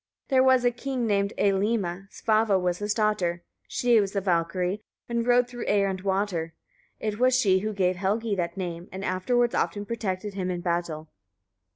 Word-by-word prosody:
There 260 Hz, -2 st, +4 dB
was 260 Hz, -1 st, +4 dB
a 245 Hz, -, +4 dB
king 250 Hz, 0 st, -3 dB
named 200 Hz, -2 st, +1 dB
Eylimi; 195 Hz, -2 st, 0 dB
Svava 215 Hz, -3 st, +2 dB
was 180 Hz, -1 st, -1 dB
his 205 Hz, 0 st, -2 dB
daughter; 205 Hz, -6 st, 0 dB, 0.2 s
she 240 Hz, -3 st, +3 dB
was 200 Hz, 0 st, -3 dB
a 200 Hz, -, +1 dB
Valkyria 180 Hz, +1 st, 0 dB, 0.3 s
and 235 Hz, 0 st, -1 dB
rode 245 Hz, 0 st, +4 dB
through 245 Hz, -1 st, -7 dB
air 200 Hz, -1 st, +3 dB
and 190 Hz, -1 st, -3 dB
water. 190 Hz, -4 st, -1 dB, 0.4 s
It 215 Hz, 0 st, -3 dB
was 255 Hz, 0 st, +4 dB
she 190 Hz, -6 st, +3 dB
who 215 Hz, +3 st, -2 dB
gave 185 Hz, -3 st, +1 dB
Helgi 210 Hz, +4 st, 0 dB
that 175 Hz, -2 st, -2 dB
name, 175 Hz, -2 st, -5 dB
and 190 Hz, +1 st, -5 dB
afterwards 240 Hz, +7 st, +1 dB
often 205 Hz, 0 st, -1 dB
protected 205 Hz, -3 st, -3 dB
him 185 Hz, -2 st, -3 dB
in 175 Hz, -1 st, -3 dB
battle. 170 Hz, -3 st, -2 dB
200 Hz, 180 wpm, -26 LUFS, 180-225 Hz, 0.4 s, There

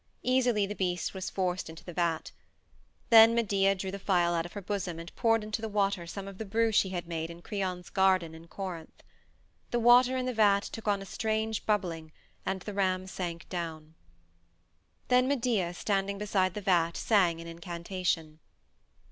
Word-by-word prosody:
Easily 245 Hz, -5 st, +2 dB
the 200 Hz, -, -4 dB
beast 180 Hz, -3 st, -2 dB
was 190 Hz, -1 st, -4 dB
forced 185 Hz, -2 st, -2 dB
into 160 Hz, +1 st, -11 dB
the 175 Hz, -, -8 dB
vat. 165 Hz, -2 st, -1 dB, 0.8 s
Then 225 Hz, 0 st, +9 dB
Medea 195 Hz, -4 st, +2 dB
drew 190 Hz, 0 st, -4 dB
the 200 Hz, -, -6 dB
phial 175 Hz, -3 st, +2 dB
out 170 Hz, 0 st, -1 dB
of -, -, -17 dB
her 205 Hz, -, -6 dB
bosom 185 Hz, -4 st, -3 dB
and 165 Hz, 0 st, -9 dB
poured 225 Hz, -1 st, +2 dB
into 215 Hz, +1 st, -4 dB
the 220 Hz, -, -3 dB
water 200 Hz, -4 st, 0 dB
some 195 Hz, +3 st, -6 dB
of 195 Hz, -1 st, -10 dB
the -, -, -2 dB
brew 225 Hz, +2 st, +1 dB
she 200 Hz, -2 st, +3 dB
had 175 Hz, -2 st, -4 dB
made 165 Hz, -1 st, -3 dB
in 170 Hz, +1 st, -11 dB
Creon's 185 Hz, -3 st, -4 dB
garden 185 Hz, -4 st, +2 dB
in 160 Hz, +1 st, -12 dB
Corinth. 180 Hz, -4 st, -7 dB, 0.7 s
The 240 Hz, -, 0 dB
water 245 Hz, +2 st, +6 dB
in 255 Hz, -, -1 dB
the 255 Hz, -, -1 dB
vat 205 Hz, -3 st, +4 dB
took 225 Hz, -1 st, -8 dB
on 200 Hz, -1 st, +1 dB
a -, -, -10 dB
strange 220 Hz, +1 st, -2 dB
bubbling, 170 Hz, -7 st, -1 dB, 0.4 s
and 190 Hz, -, -1 dB
the 210 Hz, -, -6 dB
ram 185 Hz, -2 st, 0 dB
sank 175 Hz, -3 st, -5 dB
down. 160 Hz, -3 st, -5 dB, 1.2 s
Then 250 Hz, 0 st, +4 dB
Medea, 235 Hz, -10 st, +1 dB
standing 200 Hz, +1 st, -1 dB
beside 195 Hz, -3 st, 0 dB
the 210 Hz, -, -4 dB
vat, 170 Hz, -3 st, +2 dB
sang 180 Hz, -7 st, +2 dB
an 165 Hz, -, -8 dB
incantation. 170 Hz, -1 st, -3 dB
190 Hz, 180 wpm, -30 LUFS, 170-210 Hz, 1.2 s, Then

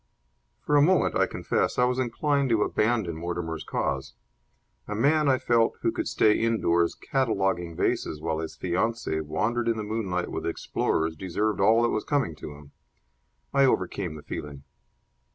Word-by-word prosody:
For 150 Hz, -, 0 dB
a -, -, +6 dB
moment, 180 Hz, +5 st, +3 dB
I -, -, +3 dB
confess, -, -, -1 dB
I 125 Hz, -, +4 dB
was 125 Hz, +1 st, 0 dB
inclined 140 Hz, +3 st, 0 dB
to 110 Hz, -3 st, +3 dB
abandon 105 Hz, -7 st, 0 dB
Mortimer's 80 Hz, -1 st, -4 dB
cause. 65 Hz, 0 st, -3 dB, 0.7 s
A 105 Hz, -, -3 dB
man, 145 Hz, +6 st, +3 dB
I 130 Hz, -, +4 dB
felt, 115 Hz, -2 st, +2 dB
who -, -, +1 dB
could -, -, -3 dB
stay 105 Hz, -1 st, +3 dB
indoors 85 Hz, -7 st, +1 dB
cataloguing 95 Hz, -10 st, -1 dB
vases 75 Hz, -, -1 dB
while 80 Hz, 0 st, -2 dB
his 80 Hz, -1 st, -5 dB
fiancee 95 Hz, -1 st, -1 dB
wandered 110 Hz, +10 st, -1 dB
in 115 Hz, -1 st, +1 dB
the 110 Hz, -, -3 dB
moonlight 105 Hz, -5 st, -2 dB
with -, -, -3 dB
explorers 80 Hz, 0 st, -1 dB
deserved 100 Hz, +6 st, -2 dB
all 110 Hz, +4 st, +5 dB
that 120 Hz, -, +3 dB
was 110 Hz, -, -1 dB
coming 140 Hz, -, 0 dB
to 75 Hz, -, -8 dB
him. 70 Hz, -1 st, -15 dB, 0.8 s
I 140 Hz, 0 st, +5 dB
overcame 95 Hz, -7 st, 0 dB
the 75 Hz, -, -10 dB
feeling. 70 Hz, -2 st, -7 dB
105 Hz, 165 wpm, -26 LUFS, 85-120 Hz, 0.8 s, a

